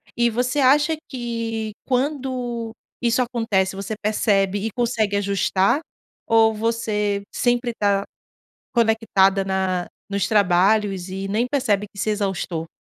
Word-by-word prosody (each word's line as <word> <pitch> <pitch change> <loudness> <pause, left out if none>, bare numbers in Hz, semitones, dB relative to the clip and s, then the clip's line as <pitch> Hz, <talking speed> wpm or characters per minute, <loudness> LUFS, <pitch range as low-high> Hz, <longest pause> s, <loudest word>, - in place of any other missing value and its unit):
E 235 0 +3
você 245 +4 -1
acha 290 +4 +4
que, 230 -3 -3
quando 255 -4 -2 0.3
isso 240 +1 +2
acontece, 225 -6 0
você 200 +2 -4
percebe 205 -2 +1
e 225 - -2
consegue 220 -3 0
ajustar 200 +5 +1 0.5
ou 225 -1 +4
você 210 -2 -1
sempre 245 0 +1
tá 200 -2 +1 0.7
conectada 220 -4 +3
na 190 -2 -1 0.2
nos 200 0 0
trabalhos 195 -1 +2
e 195 +1 -4
nem 220 +5 +1
percebe 250 -7 0
que 200 - -14
se - - -1
exaustou? 190 -5 -2
220 Hz, 120 wpm, -22 LUFS, 195-240 Hz, 0.7 s, acha